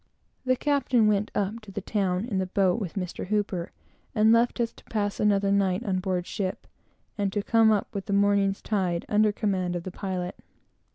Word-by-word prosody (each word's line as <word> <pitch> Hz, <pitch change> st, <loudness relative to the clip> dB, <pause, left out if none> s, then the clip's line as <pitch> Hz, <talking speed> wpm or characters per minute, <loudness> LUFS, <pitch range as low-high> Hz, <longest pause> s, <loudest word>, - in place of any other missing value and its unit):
The 255 Hz, 0 st, +3 dB
captain 260 Hz, -5 st, +2 dB
went 210 Hz, 0 st, +2 dB
up 205 Hz, +3 st, -1 dB
to 215 Hz, -2 st, -12 dB
town 195 Hz, -1 st, -1 dB
in 205 Hz, -6 st, -2 dB
the 190 Hz, -, -1 dB
boat 190 Hz, +2 st, +2 dB
with 185 Hz, -5 st, -5 dB
Mr. 180 Hz, 0 st, -5 dB
H, 200 Hz, -5 st, -1 dB, 0.5 s
and 220 Hz, +1 st, +5 dB
left 235 Hz, +2 st, +3 dB
us 230 Hz, -1 st, 0 dB
to -, -, -18 dB
pass 205 Hz, -2 st, -2 dB
another 200 Hz, -1 st, +2 dB
night 195 Hz, -2 st, +1 dB
on 190 Hz, -3 st, 0 dB
board 185 Hz, -2 st, -2 dB
ship, 190 Hz, -2 st, -4 dB, 0.5 s
and 200 Hz, -1 st, +1 dB
to 205 Hz, 0 st, -1 dB
come 225 Hz, 0 st, +4 dB
up 210 Hz, -2 st, 0 dB
with 200 Hz, 0 st, -5 dB
the -, -, -3 dB
morning's 200 Hz, -1 st, +2 dB
tide 185 Hz, -5 st, -1 dB
under 210 Hz, 0 st, +3 dB
command 190 Hz, -4 st, -1 dB
of 175 Hz, -, -3 dB
the 185 Hz, -, -6 dB
pilot. 185 Hz, -1 st, -4 dB
200 Hz, 190 wpm, -26 LUFS, 185-215 Hz, 0.5 s, and